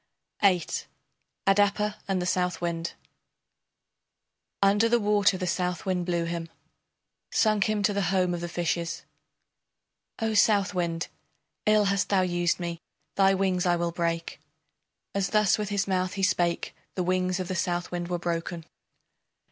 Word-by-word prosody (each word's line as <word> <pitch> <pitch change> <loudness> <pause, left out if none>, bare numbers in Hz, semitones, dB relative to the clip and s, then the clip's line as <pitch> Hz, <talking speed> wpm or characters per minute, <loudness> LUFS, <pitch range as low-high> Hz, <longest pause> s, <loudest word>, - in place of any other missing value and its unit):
] - - -35
VIII. 185 -4 +4 0.8
ADAPA 205 +1 +2
AND 195 -2 0
THE 180 - -2
SOUTHWIND 175 -2 -1 1.7
Under 205 +3 +4
the 240 0 +4
water 205 -2 +3
the 185 - -3
Southwind 180 0 -1
blew 170 -1 0
him 165 -1 -4 0.8
Sunk 215 -3 +3
him 215 -1 0
to 205 +1 +2
the 200 - 0
home 185 -2 +2
of 175 - -3
the 175 - -4
fishes. 170 0 -2 1.1
O 225 -1 -1
Southwind, 190 -6 +2 0.6
ill 215 -1 +5
hast 195 -1 +1
thou 195 -2 +3
used 175 -1 +1
me, 170 -1 -4 0.3
thy 195 0 +4
wings 185 -2 +1
I 175 - +4
will 170 0 -1
break. 170 -1 -2 0.7
As 195 -1 0
thus 210 -1 +3
with 210 -2 -2
his 200 -1 0
mouth 185 -1 0
he 195 -1 -3
spake 175 -3 +1 0.2
the 185 - 0
wings 185 0 0
of 185 - -3
the 185 - -3
Southwind 175 0 -2
were 175 0 -1
broken. 170 -1 -3
185 Hz, 145 wpm, -27 LUFS, 175-200 Hz, 1.7 s, ill